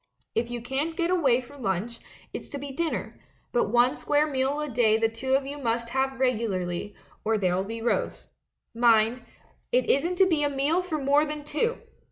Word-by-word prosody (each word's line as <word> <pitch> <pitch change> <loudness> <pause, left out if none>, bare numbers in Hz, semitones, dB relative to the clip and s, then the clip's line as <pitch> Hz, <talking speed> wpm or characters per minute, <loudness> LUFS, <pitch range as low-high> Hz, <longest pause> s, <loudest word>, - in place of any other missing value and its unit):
If 235 +1 -1
you 240 -1 -5
can't 285 +6 -2
get 345 0 +1
away 270 -9 +3
for 260 +3 -14
lunch, 225 +1 -2 0.3
it's - - -6
to 285 - -5
be 280 0 -6
dinner; 325 +4 -3 0.3
but 240 - +2
one 240 +3 +4
square 295 +1 +2
meal 275 0 0
a 300 - -2
day 225 -4 +3
the 225 0 +2
two 260 +4 -1
of 270 0 +1
you 285 +1 -6
must 235 -2 -1
have 265 +1 -1
regularly, 205 -7 -1 0.3
or 220 0 +1
there'll 185 -1 +1
be 225 +3 -6
rows. 240 - -1 0.5
Mind, 230 +1 +3 0.5
it - - +2
isn't 335 +7 +1
to 380 +1 +5
be 325 -5 +1
a 290 - +2
meal 285 +6 +1
for 360 -4 -3
more 285 +1 +3
than 300 -1 -4
two!" 385 +12 -1
265 Hz, 195 wpm, -27 LUFS, 230-295 Hz, 0.5 s, to